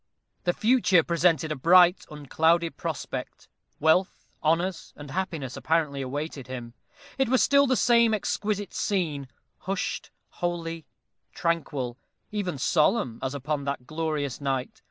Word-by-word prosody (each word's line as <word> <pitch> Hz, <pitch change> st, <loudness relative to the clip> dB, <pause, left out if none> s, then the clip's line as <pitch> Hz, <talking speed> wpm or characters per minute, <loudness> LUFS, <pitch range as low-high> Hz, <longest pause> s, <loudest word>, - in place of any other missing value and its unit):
The 175 Hz, -, +2 dB
future 215 Hz, -7 st, +4 dB
presented 165 Hz, -2 st, +2 dB
a -, -, -1 dB
bright 175 Hz, +5 st, +5 dB
unclouded 160 Hz, +3 st, +1 dB
prospect. -, -, -5 dB, 0.3 s
Wealth, 160 Hz, +5 st, +2 dB, 0.2 s
honors, 165 Hz, +2 st, 0 dB
and 145 Hz, -2 st, -10 dB
happiness 165 Hz, -8 st, -3 dB
apparently 155 Hz, -4 st, 0 dB
awaited 140 Hz, 0 st, -5 dB
him. 120 Hz, -2 st, -7 dB, 0.5 s
It 265 Hz, -3 st, +2 dB
was 260 Hz, 0 st, +4 dB
still 280 Hz, 0 st, +5 dB
the 260 Hz, -, +3 dB
same 235 Hz, -2 st, +4 dB
exquisite 205 Hz, -2 st, -2 dB
scene, 155 Hz, -9 st, -1 dB, 0.3 s
hushed, 195 Hz, 0 st, -3 dB, 0.3 s
holy, 165 Hz, -2 st, -3 dB, 0.5 s
tranquil 145 Hz, -7 st, -2 dB, 0.3 s
even 200 Hz, -7 st, -2 dB
solemn, 135 Hz, -, +1 dB
as 130 Hz, +1 st, -3 dB
upon 140 Hz, +1 st, -3 dB
that 140 Hz, -3 st, -3 dB
glorious 155 Hz, -3 st, -3 dB
night. 135 Hz, -2 st, -2 dB
165 Hz, 125 wpm, -26 LUFS, 140-185 Hz, 0.5 s, bright